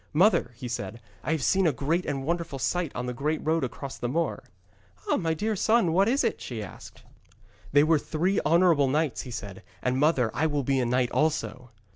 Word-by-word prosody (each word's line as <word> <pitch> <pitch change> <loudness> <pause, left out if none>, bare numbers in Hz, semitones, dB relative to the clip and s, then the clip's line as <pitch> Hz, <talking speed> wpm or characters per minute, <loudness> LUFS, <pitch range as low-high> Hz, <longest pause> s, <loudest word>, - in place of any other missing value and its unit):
'Mother,' 180 - +4
he 125 +1 -7
said, 115 -2 -5 0.2
'I - - -2
have 155 -5 -2
seen 190 +4 +3
a - - +4
great 160 +7 -1
and 135 -2 -2
wonderful 170 -3 -2
sight 170 +3 -1
on 125 - -3
the 125 - -3
great 150 +5 -1
road 160 0 +1
across 130 +2 -5
the 120 - -2
moor.' 165 +4 -1 0.6
'Ah, - - +2
my 165 -2 0
dear 215 +6 -1
son, 220 -4 +2
what 195 +4 +4
was 270 +4 +2
that?' 230 - -1
she 115 -4 -5
asked. 90 - -12 0.7
'They 145 +1 +6
were 155 0 +3
three 180 +7 0
honourable 165 -4 +4
knights,' 150 +1 0
he 130 - -9
said. 100 -5 -7 0.2
'And, 125 +1 0
mother, 135 -6 +2
I 160 - +1
will 145 -2 -1
be 135 +1 +1
a 125 - 0
knight 125 0 +1
also.' 150 -5 -1
150 Hz, 210 wpm, -27 LUFS, 125-170 Hz, 0.7 s, They